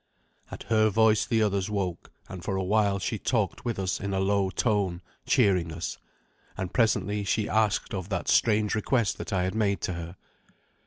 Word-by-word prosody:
At - - -8
her 110 -1 +3
voice 110 0 +3
the 110 -1 +2
others 100 -1 0
woke, 95 -5 -3 0.2
and 90 -2 -8
for 95 - -2
a 95 - -1
while 100 0 +2
she 95 - -3
talked - - -1
with 120 -2 -2
us 95 -1 -1
in 100 0 -3
a - - 0
low 100 0 +1
tone, 95 -4 0 0.2
cheering 90 -4 +3
us. 85 +2 -5 0.6
And 95 -2 -4
presently 105 -3 +1
she 105 +2 0
asked 110 -2 +1
of 95 -1 -4
that 100 - -3
strange 105 -2 +3
request 110 0 0
that - - -6
I 95 -2 +1
had 95 - -1
made 100 -4 +1
to 95 - -2
her. 85 +1 -7
100 Hz, 190 wpm, -27 LUFS, 95-110 Hz, 0.6 s, her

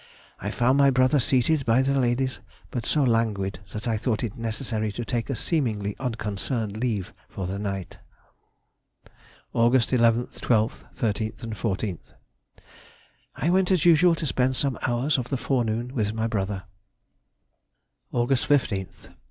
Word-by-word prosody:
I 100 - -3
found 125 +5 +2
my 140 -1 +6
brother 130 +2 +3
seated 135 +4 +2
by 120 +2 +3
the 135 +1 +1
ladies, 130 0 +1 0.3
but 120 -2 -3
so 150 - +2
languid 110 -6 +1
that 105 +2 -5
I 115 -2 +1
thought 110 0 -1
it 110 -4 -3
necessary 110 -1 -2
to 120 +2 -4
take 115 +3 -2
a 135 - -1
seemingly 110 - -1
unconcerned 110 -2 -2
leave 110 -3 -2 0.2
for 95 - -5
the 95 +2 -3
night. 100 -3 -4 1.5
Aug. 120 +2 +4
11th, 120 -1 +2
12th, 110 -2 +1
13th, 110 0 -2
and 115 -1 -4
14th. 100 -2 -3 1.2
I 165 - 0
went 185 0 +3
as 185 -4 +2
usual 170 0 +6
to 160 - -4
spend 130 -2 +1
some 135 -1 -1
hours 130 +4 +1
of 125 - -4
the 135 - 0
forenoon 120 -1 -1
with 110 -4 -1
my 110 0 0
brother. 100 -3 -2 1.5
_Aug. 120 +1 0
15th. 125 -8 0
120 Hz, 145 wpm, -25 LUFS, 110-130 Hz, 1.5 s, my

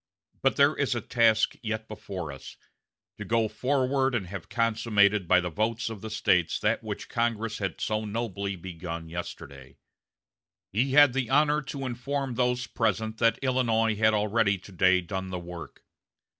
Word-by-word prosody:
But - - +2
there - - +4
is - - 0
a - - -2
task 110 -2 +2
yet 110 -1 -4
before 95 -7 -6
us 70 - -11 0.6
to - - -4
go 115 -1 +1
forward 130 +1 0
and 105 -6 -1
have 95 0 -8
consummated 105 -4 +2
by 90 +1 +5
the 90 -1 -3
votes 110 +4 -1
of 105 -3 -8
the 110 - -6
States 90 -5 +1
that - - +1
which - - -5
Congress 115 -2 -1
had 95 -4 -3
so 110 0 -1
nobly 100 -3 -3
begun 85 -2 -7
yesterday. 70 -5 -8 1.0
He 130 +6 +1
had 145 -3 +7
the 130 -3 -1
honor 150 +2 +3
to 135 -2 -4
inform 135 +2 -3
those 125 +1 0
present 110 -1 -1
that 115 -1 +3
Illinois 115 -4 +2
had 110 +1 +3
already 105 -1 +2
to 95 - -14
day 95 0 +3
done 95 +2 -5
the 90 - -4
work. 85 -3 -9
110 Hz, 165 wpm, -27 LUFS, 95-120 Hz, 1.0 s, had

